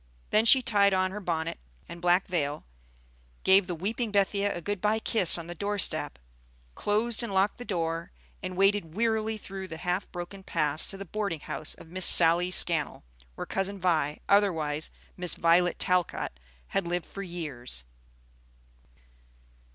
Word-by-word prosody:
Then 215 +1 +3
she 260 +2 +7
tied 200 -4 +3
on 185 0 0
her 210 - -6
bonnet 165 -4 -3 0.3
and 170 0 -10
black 180 +2 +2
veil, 150 -5 -3 0.8
gave 190 0 +4
the 175 - -3
weeping 215 +6 -3
Bethia 200 0 +1
a 175 - -5
good 205 +2 -4
by 215 +1 +1
kiss 220 -6 +6
on 170 - -7
the 175 - -7
door 205 +4 -3
step, 65 - +2 0.6
closed 220 - +1
and 235 -3 -3
locked 195 +3 +1
the 245 - -7
door, 165 -3 -3 0.3
and 185 -1 -6
waded 195 -4 +1
wearily 220 0 0
through 195 -2 -8
the 160 - -8
half 180 +3 -3
broken 175 +2 -8
paths 150 -4 0
to 195 - -3
the 195 - -8
boarding 200 -5 -4
house 150 - -4
of 160 - -15
Miss 185 0 +2
Sally 170 +1 +4
Scannell, 170 -4 +1 0.3
where - - -6
Cousin 195 +1 -2
Vi, 160 -5 0
otherwise 160 -7 +1 0.3
Miss 180 -1 +2
Violet 170 +1 +2
Talcott, 180 -2 0 0.4
had 195 -3 -2
lived 175 0 -2
for 200 - -9
years. 150 - -4
185 Hz, 160 wpm, -27 LUFS, 170-205 Hz, 0.8 s, she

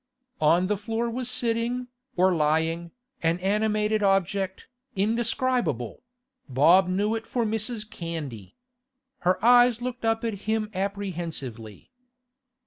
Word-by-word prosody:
On 165 +4 +4
the 205 +2 0
floor 225 +3 -2
was 250 +1 -2
sitting, 240 0 0 0.3
or 185 +1 +4
lying, 160 +2 0 0.3
an 165 +1 +2
animated 210 +2 +1
object, 195 -1 0 0.3
indescribable; 225 - 0 0.5
Bob 165 +9 +5
knew 200 +4 0
it 225 0 -4
for 240 -2 -1
Mrs. 220 0 -2
Candy. 155 - -7 0.6
Her 180 +1 +2
eyes 245 -1 +6
looked 250 0 -5
up 225 0 +1
at 215 -2 -4
him 220 -1 0
apprehensively. 170 - -5
200 Hz, 115 wpm, -26 LUFS, 170-225 Hz, 0.6 s, eyes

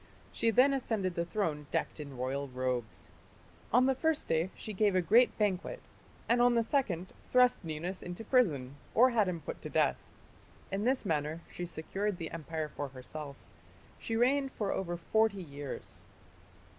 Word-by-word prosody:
She 230 - +1
then 255 +5 +5
ascended 220 -8 -1
the 170 0 -1
throne 160 -6 -2
decked - - -2
in 140 -3 -7
royal 135 +3 -2
robes. 125 -3 -3 0.6
On 250 +3 +5
the 265 - +4
first 320 +3 0
day 165 +3 +1
she 215 - -6
gave 205 -1 +2
a - - +5
great 235 +8 +5
banquet, 210 - 0 0.5
and 240 +1 +3
on 245 0 +5
the 230 - +3
second 195 - -1
thrust 250 -3 +4
Ninus 170 +4 -4
into 175 +5 -6
prison, 155 - +2 0.2
or 255 +3 +6
had 220 -4 +3
him 170 -3 -2
put - - -6
to - - -6
death. - - +2 0.7
In 200 +3 -1
this 255 -2 +2
manner 155 -1 -1
she 175 - -6
secured 195 +5 -3
the 165 -2 -5
empire 160 -1 -4
for 145 - -3
herself. 140 +2 -8 0.6
She 225 - -3
reigned 270 +3 +2
for 205 -3 -1
over 175 -2 -2
forty 200 +2 +1
years. 145 -3 -7
185 Hz, 170 wpm, -32 LUFS, 155-230 Hz, 0.7 s, or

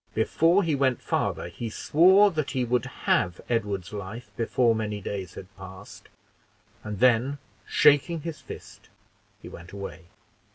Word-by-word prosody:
Before 165 - +3
he 165 -3 0
went 130 -3 +1
farther, - - -2
he 110 +7 -6
swore 190 - +5
that 155 -4 -2
he 130 -3 -1
would 125 +1 0 0.2
have 90 -1 +2
Edward's 100 -5 -2
life 105 +4 -7
before 120 0 +2
many 105 -2 -3
days 95 -3 -6
had 95 +1 -11
passed, 95 +1 -12 0.7
and 105 -2 -6
then 125 +3 +3 0.3
shaking 150 +3 +4
his 155 -2 -6
fist, - - -11 0.5
he - - -8
went 85 +1 -11
away. 85 -5 -8
115 Hz, 140 wpm, -26 LUFS, 100-145 Hz, 0.7 s, swore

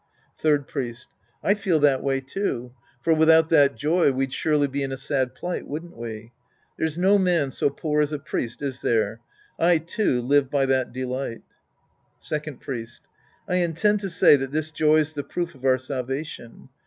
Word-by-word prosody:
Third 145 -3 +2
Priest. 120 -4 -5 0.3
I 200 - +4
feel 200 -5 +1
that 140 -3 +4
way, 135 -1 0
too. 130 -4 -3 0.3
For 165 - +4
without 160 0 +5
that 145 -6 +5
joy 155 +5 +2
we'd 135 0 -2
surely 150 0 +2
be 140 +1 -3
in 135 -1 -2
a 135 - -4
sad 130 -2 -1
plight, 180 0 -4
wouldn't 165 +4 -6
we? 115 -1 -7 0.4
There's 160 0 -2
no 195 +3 +4
man 170 -7 +2
so 140 - +1
poor 150 +2 -1
as 150 0 0
a 150 - -2
priest, 125 -3 -4
is 130 -3 -4
there? 110 -1 0 0.4
I, 170 0 +4
too, 165 - 0
live 140 +1 +3
by 140 -1 +2
that 130 -1 +1
delight. 130 -1 -4 0.8
Second 150 -3 -5
Priest. 120 -3 -7 0.4
I 180 - +1
intend 180 +5 +1
to 195 -1 -4
say 170 - +6
that 135 -1 -3
this 155 +2 -2
joy's 155 0 +2
the 145 -1 -4
proof 170 +4 -4
of 135 -2 -11
our 130 -1 +4
salvation. 130 -1 -6
145 Hz, 180 wpm, -24 LUFS, 130-160 Hz, 0.8 s, say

